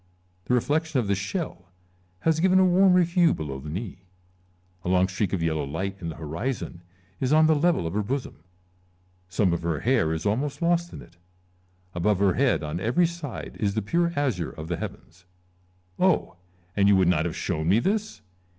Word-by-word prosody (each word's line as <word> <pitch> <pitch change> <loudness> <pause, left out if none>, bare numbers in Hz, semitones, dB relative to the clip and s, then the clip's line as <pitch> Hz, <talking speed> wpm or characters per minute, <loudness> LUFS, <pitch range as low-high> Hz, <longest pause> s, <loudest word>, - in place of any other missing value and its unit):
The 125 - +2
reflection 150 +3 0
of 120 - -1
the 100 - +1
shell 100 - -4 0.6
has 160 +4 +2
given 185 +2 +4
a 190 - +6
warmer 180 0 +5
hue 170 -1 +3
below 70 -3 -5
the 75 +3 -8
knee; 95 +3 -5 0.8
a - - -2
long 90 0 +3
streak 95 +1 -2
of 90 -4 -1
yellow 80 -2 0
light 95 +8 -3
in 85 - -4
the 80 - -6
horizon 85 - -4 0.4
is 130 0 0
on 155 +1 +6
the 160 - +5
level 155 - +2
of 80 - -3
her 105 - 0
bosom, 130 +6 -4 0.9
some 95 -1 +1
of 85 - -2
her 85 -2 -2
hair 120 -10 +2
is 80 0 -3
almost 130 +8 -1
lost 170 0 +1
in - - -9
it; 85 - -20 0.8
above 95 +3 +1
her 100 -1 +3
head 130 - +1
on 75 +3 -3
every 125 - +2
side 165 -6 -6
is 100 -2 0
the 110 - -1
pure 170 +9 +1
azure 125 - -1
of 80 +1 -9
the 85 - -1
heavens. 90 +2 -9 0.7
Oh! 185 - +2 0.4
and 100 -1 +3
you 100 - +6
would 95 -2 +3
not 85 -2 +2
have 85 - -3
shown 80 +1 -2
me 100 - +5
this 200 - -1
105 Hz, 195 wpm, -25 LUFS, -, 0.9 s, a